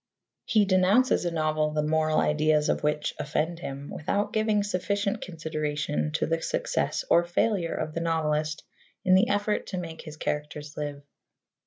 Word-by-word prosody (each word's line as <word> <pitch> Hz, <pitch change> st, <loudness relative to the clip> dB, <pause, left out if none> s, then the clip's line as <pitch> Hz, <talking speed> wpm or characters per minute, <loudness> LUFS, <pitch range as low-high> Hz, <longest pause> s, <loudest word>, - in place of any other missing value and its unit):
He 220 Hz, -4 st, +3 dB
denounces 190 Hz, +5 st, +3 dB
a -, -, +2 dB
novel 155 Hz, -1 st, 0 dB
the 150 Hz, 0 st, +1 dB
moral 155 Hz, 0 st, +2 dB
ideas 150 Hz, 0 st, +2 dB
of -, -, +1 dB
which 150 Hz, 0 st, 0 dB
offend 160 Hz, +3 st, -1 dB
him, 140 Hz, -3 st, -6 dB
without 200 Hz, +7 st, -1 dB
giving 215 Hz, -1 st, +2 dB
sufficient 200 Hz, +2 st, -1 dB
consideration 155 Hz, -3 st, -2 dB
to 165 Hz, -, +1 dB
the 165 Hz, +1 st, -1 dB
success -, -, -1 dB
or 170 Hz, -, +5 dB
failure 175 Hz, 0 st, 0 dB
of 155 Hz, -, -3 dB
the 165 Hz, -, -2 dB
novelist 155 Hz, -1 st, 0 dB, 0.4 s
in 185 Hz, -, +5 dB
the 190 Hz, +6 st, +5 dB
effort 205 Hz, +1 st, 0 dB
to 185 Hz, -, -4 dB
make 165 Hz, -2 st, -6 dB
his 155 Hz, -2 st, -10 dB
characters 150 Hz, 0 st, -4 dB
live. 145 Hz, -1 st, -5 dB
160 Hz, 160 wpm, -27 LUFS, 150-185 Hz, 0.4 s, or